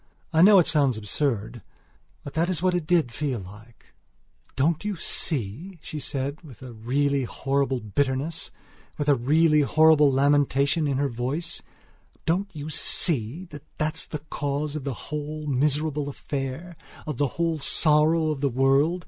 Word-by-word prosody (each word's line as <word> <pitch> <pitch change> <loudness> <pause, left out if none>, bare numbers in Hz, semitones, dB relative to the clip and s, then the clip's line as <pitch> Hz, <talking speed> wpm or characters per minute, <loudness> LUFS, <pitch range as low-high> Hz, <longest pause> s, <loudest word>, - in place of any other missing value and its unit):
I 160 - +4
know 200 +2 +8
it 175 - +5
sounds 140 -7 +2
absurd; 110 +1 -2 0.6
but 140 - -8
that 165 +2 0
is 180 -2 -1
what 185 -1 +2
it 175 -3 -2
did 165 -8 +2
feel 135 +1 -2
like. 105 +5 -15 0.6
"Don't 150 +6 +1
you 210 -1 -2
see," 155 - 0
she 155 - -6
said, 140 +2 -3
with 140 -7 -14
a 125 -2 -9
really 135 +4 0
horrible 135 +1 -1
bitterness, 140 +8 -2 0.5
with 145 - -3
a 145 - +6
really 150 +5 +3
horrible 150 0 +5
lamentation 140 +2 +2
in 140 -2 0
her 140 +1 +1
voice, 135 +8 -3 0.6
"Don't 185 +5 0
you 150 -2 -7
see 155 -1 +1
that 145 -1 -9 0.2
that's 155 0 -2
the - - -4
cause 145 +1 -2
of 145 -3 -5
the 135 -3 -3 0.2
whole 150 +1 -4
miserable 145 +1 0
affair; 140 +5 -5 0.3
of 150 -5 -4
the 145 - +1
whole 165 -2 0
sorrow 155 +2 +3
of 145 -3 -4
the 140 - +2
world? 135 +7 +2
145 Hz, 155 wpm, -25 LUFS, 135-160 Hz, 0.6 s, know